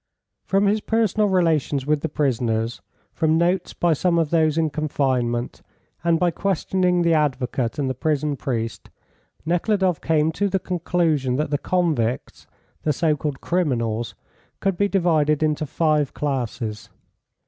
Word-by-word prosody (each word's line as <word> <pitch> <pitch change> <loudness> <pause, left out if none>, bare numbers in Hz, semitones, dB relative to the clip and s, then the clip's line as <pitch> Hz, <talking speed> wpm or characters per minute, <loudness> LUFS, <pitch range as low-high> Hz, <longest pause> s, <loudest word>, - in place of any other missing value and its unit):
From 195 +1 +2
his 210 +2 +2
personal 215 -2 +1
relations 160 -7 +1
with 150 0 +1
the 160 - -2
prisoners, 120 -5 -1 0.3
from 160 0 +2
notes 175 +3 0
by 175 -2 +2
some 170 +3 +1
of 160 -3 +1
those 160 -2 +2
in 160 -2 +1
confinement, 130 -6 -1 0.4
and 170 -1 +2
by 180 -1 +2
questioning 180 -1 0
the 170 -1 +3
advocate 130 -5 0
and 140 -2 -1
the 130 - -1
prison 150 +1 -1
priest, 115 -5 -4 0.6
Nekhludoff 180 0 +1
came 160 -1 +2
to 200 +5 -1
the 190 - +1
conclusion 170 -7 0
that 150 +2 -1
the 145 - +1
convicts, 150 -11 -1 0.3
the 155 - +1
so 155 +1 +1
called 145 -2 -4
criminals, 120 -10 -1 0.4
could 195 -1 0
be 200 +3 +2
divided 160 -6 +2
into 155 0 0
five 150 -2 +1
classes. 120 -6 -3
155 Hz, 145 wpm, -22 LUFS, 135-175 Hz, 0.6 s, the